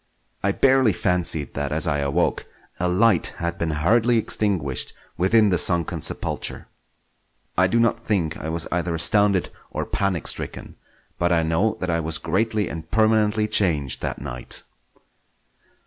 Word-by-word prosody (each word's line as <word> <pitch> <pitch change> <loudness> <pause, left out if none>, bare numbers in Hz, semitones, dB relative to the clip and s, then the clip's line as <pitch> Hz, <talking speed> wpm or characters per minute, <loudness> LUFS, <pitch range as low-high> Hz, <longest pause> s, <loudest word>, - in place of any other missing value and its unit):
I 100 - +1
barely 130 -1 +3
fancied 85 -4 0
that 70 0 -3
as 80 +1 +1
I 75 -3 0
awoke, 70 -1 0 0.3
a 90 - +1
light 95 +1 +3
had 85 0 -3
been 85 - -1
hurriedly 110 +10 +2
extinguished 95 - -1 0.2
within 105 +4 +3
the 90 -3 +2
sunken 85 -3 +2
sepulchre. - - -1 0.9
I 90 +1 +4
do 115 +6 +1
not 115 0 +1
think 85 -8 -1
I 80 - -6
was 80 -1 -3
either 85 -1 -1
astounded 100 +2 +2 0.2
or - - -4
panic 100 -5 -2
stricken, - - -4 0.4
but 85 0 +1
I 85 -1 +2
know 95 +8 0
that 90 -1 -1
I 85 - 0
was 80 0 -2
greatly 105 +4 -1
and 80 +1 -7
permanently 110 -1 +2
changed 80 -11 +1
that - - -3
night. 60 -2 -6
90 Hz, 150 wpm, -23 LUFS, 80-105 Hz, 0.9 s, I